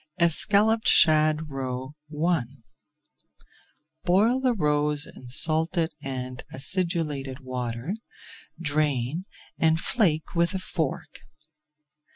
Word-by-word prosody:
ESCALLOPED 205 +6 +4
SHAD 155 -1 +4
ROE 130 0 -5 0.3
I 175 -4 +2 1.6
Boil 215 +8 +2
the 255 -2 +1
roes 150 -3 +1
in 125 - -14
salted 160 +5 +3
and 130 -1 -5
acidulated 145 -3 -1
water, 125 +4 -5 0.7
drain, 150 0 -1 0.3
and 160 0 +2
flake 165 -7 0
with 170 +3 +1
a - - -2
fork. 160 -5 -4
155 Hz, 90 wpm, -25 LUFS, 135-175 Hz, 1.6 s, ESCALLOPED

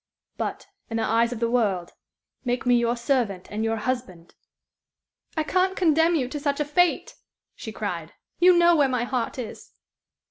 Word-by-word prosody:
"But, - - -4 0.2
in 225 - -2
the 225 - 0
eyes 230 +2 +2
of 245 - -5
the 230 - +1
world, 200 -8 0 0.5
make 245 0 -2
me 245 - +4
your 235 0 +1
servant 235 -7 -1
and 215 +1 -2
your 225 0 0
husband!" 220 -8 -4 1.0
"I 315 - +2
can't 370 +4 +1
condemn 325 -1 +3
you 265 -6 0
to 295 - -4
such 285 0 -1
a 295 - +1
fate," 345 +4 +1 0.4
she - - -8
cried. - - -5 0.3
"You 360 0 +6
know 345 0 +6
where 285 -4 +3
my 250 -2 0
heart 245 -1 -2
is." 245 -4 -8
250 Hz, 175 wpm, -25 LUFS, 230-305 Hz, 1.0 s, You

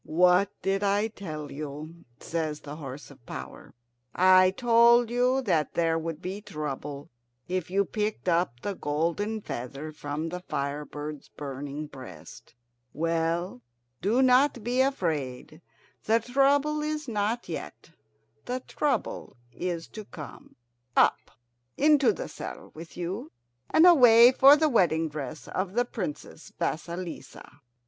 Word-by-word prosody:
"What 180 +4 +4
did 195 +1 0
I 205 +2 +2
tell 155 -9 -7
you?" 155 +3 -8
says 155 -2 -3
the 145 0 -8
horse 140 -1 -8
of 135 -3 -18
power. - - -9 0.4
"I 185 0 +6
told 235 +2 +4
you 250 +2 +2
that 165 -9 0
there 165 -1 +2
would 165 0 -5
be 190 +3 -5
trouble 150 -6 -6 0.4
if 180 -1 -2
you 200 +2 +2
picked 210 -1 -3
up 170 -9 +1
the 205 - -2
golden 170 +8 -2
feather 135 +1 -6
from 150 +1 -4
the 180 +2 -5
fire 145 -4 -3
bird's 150 -1 -7
burning 145 +1 -6
breast. 130 - -12 0.4
Well, 165 -1 -1 0.4
do 230 +7 +3
not 255 -1 +4
be 245 +3 +1
afraid. 155 - -2 0.4
The 225 +1 +4
trouble 280 +5 +2
is 305 -1 -3
not 220 +1 -1
yet; 165 0 -7 0.5
the 255 +1 -3
trouble 285 - -2 0.2
is 170 +2 -4
to 215 -1 -9
come. 155 -6 -11 0.4
Up! - - +3 0.5
into 285 -5 +5
the 190 - -5
saddle 150 - -8
with 165 +2 -11
you, 175 -2 -4 0.4
and 320 - +5
away 245 -8 +8
for 275 +2 +8
the 310 +1 +3
wedding 165 - +2
dress 145 -1 -7
of 185 0 -3
the 245 +2 +2
Princess 180 -8 -6
Vasilissa!" 170 +1 -5
180 Hz, 135 wpm, -27 LUFS, 155-230 Hz, 0.5 s, away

